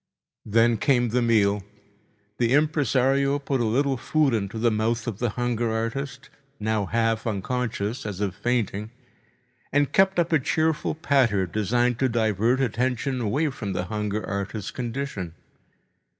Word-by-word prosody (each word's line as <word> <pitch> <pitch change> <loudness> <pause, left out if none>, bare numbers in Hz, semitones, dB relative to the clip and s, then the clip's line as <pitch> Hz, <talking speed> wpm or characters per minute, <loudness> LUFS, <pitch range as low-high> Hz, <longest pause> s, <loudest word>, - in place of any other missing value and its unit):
Then 115 +2 +3
came 120 +1 +2
the 125 +3 +1
meal. 105 -4 +3 0.8
The 120 0 +2
impresario 140 -2 +2
put 140 -2 -1
a - - +1
little 135 +4 +1
food 150 +1 +1
into 110 0 -2
mouth 115 +2 0
of 110 -5 -4
the 120 - 0
hunger 120 -2 0
artist, 125 +4 -4 0.3
now 105 -2 0
half 115 +1 0
unconscious, 110 +1 -2
as 105 -3 -5
if 100 -3 -1
fainting, 105 -1 -1 0.8
and 145 0 +1
kept 190 0 +4
up 170 0 +1
a 160 - +5
cheerful 155 +3 0
patter 130 - +2
designed 115 +6 0
to 130 - +2
divert 115 +2 +1
attention 125 +2 -1
away 140 +8 0
from 105 -7 -5
the 90 - -1
hunger 105 0 -2
artist's 100 0 -4
condition. 120 -8 -4
120 Hz, 140 wpm, -25 LUFS, 105-135 Hz, 0.8 s, a